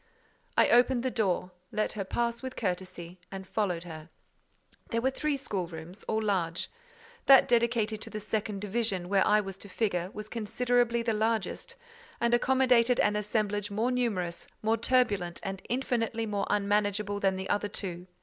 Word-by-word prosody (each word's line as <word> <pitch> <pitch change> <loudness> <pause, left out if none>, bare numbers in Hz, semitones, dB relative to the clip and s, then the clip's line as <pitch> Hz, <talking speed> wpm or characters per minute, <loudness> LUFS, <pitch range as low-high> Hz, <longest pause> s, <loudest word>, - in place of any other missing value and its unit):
I - - +6
opened 245 0 +4
the 260 - 0
door, 185 -5 0 0.2
let 215 0 0
her 205 - -3
pass 235 +4 -1
with 260 -1 -6
courtesy, 185 -3 -4
and 190 -1 -6
followed 185 -4 -1
her. 160 -2 -9 0.8
There 230 - 0
were 260 +3 +1
three 295 +1 -1
schoolrooms, 180 -6 -5
all 220 0 0
large. 180 -5 -1 0.6
That 270 -1 +8
dedicated 230 -2 +2
to - - -6
the 215 - -5
second 210 -1 -2
division, 205 -4 -1
where 195 -1 +4
I 210 0 +5
was 195 -1 -7
to 205 - -11
figure, 180 -4 -1
was 210 0 -7
considerably 235 +2 +1
the 230 -1 +1
largest, 225 - -1 0.4
and 235 0 +2
accommodated 250 -1 +4
an 210 - +3
assemblage 210 0 -1
more 220 +5 0
numerous, 205 -9 -1 0.2
more 220 +1 +3
turbulent, 210 -8 +1
and 195 -1 -4
infinitely 230 -3 -1
more 205 -2 -2
unmanageable 205 0 +1
than 195 -1 +2
the 190 0 -4
other 205 +1 0
two. 180 -3 -4
210 Hz, 160 wpm, -29 LUFS, 190-235 Hz, 0.8 s, That